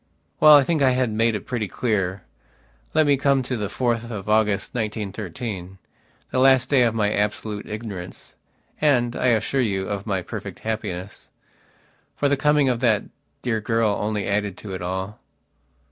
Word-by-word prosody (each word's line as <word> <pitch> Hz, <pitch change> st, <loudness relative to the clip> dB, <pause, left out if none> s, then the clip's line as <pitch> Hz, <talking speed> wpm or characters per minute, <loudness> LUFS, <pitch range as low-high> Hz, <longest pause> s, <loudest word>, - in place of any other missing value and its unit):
Well, 155 Hz, -1 st, +9 dB
I 145 Hz, -, +7 dB
think 160 Hz, +1 st, 0 dB
I 130 Hz, -2 st, +4 dB
have 125 Hz, -2 st, +1 dB
made 115 Hz, +1 st, +2 dB
it 105 Hz, -, -5 dB
pretty 120 Hz, -5 st, -2 dB
clear. 100 Hz, -5 st, -1 dB, 0.7 s
Let 155 Hz, 0 st, +5 dB
me 145 Hz, -1 st, +4 dB
come 140 Hz, -1 st, +2 dB
to 125 Hz, +1 st, -3 dB
the 105 Hz, -3 st, -2 dB
4th 120 Hz, +1 st, -1 dB
of 105 Hz, -4 st, -6 dB
August, 105 Hz, -2 st, +1 dB
1913, 105 Hz, -3 st, -4 dB, 0.5 s
the 130 Hz, -, 0 dB
last 130 Hz, -1 st, +5 dB
day 140 Hz, -3 st, +4 dB
of 115 Hz, -2 st, +2 dB
my 105 Hz, -1 st, +1 dB
absolute 105 Hz, 0 st, -2 dB
ignoranceand, 120 Hz, +5 st, -3 dB
I -, -, 0 dB
assure 125 Hz, +3 st, +2 dB
you, 95 Hz, -5 st, -1 dB
of 100 Hz, +1 st, -4 dB
my 95 Hz, -3 st, -1 dB
perfect -, -, -7 dB
happiness. 105 Hz, -4 st, -5 dB, 0.9 s
For 145 Hz, -, +1 dB
the 140 Hz, -, +3 dB
coming 150 Hz, 0 st, +3 dB
of 125 Hz, -2 st, +1 dB
that 115 Hz, -4 st, +2 dB, 0.4 s
dear 115 Hz, -3 st, 0 dB
girl 115 Hz, 0 st, +1 dB
only 105 Hz, 0 st, -2 dB
added 100 Hz, -1 st, -1 dB
to 100 Hz, -3 st, -8 dB
it 90 Hz, -, -5 dB
all. 95 Hz, +3 st, -4 dB
110 Hz, 165 wpm, -23 LUFS, 100-125 Hz, 0.9 s, Well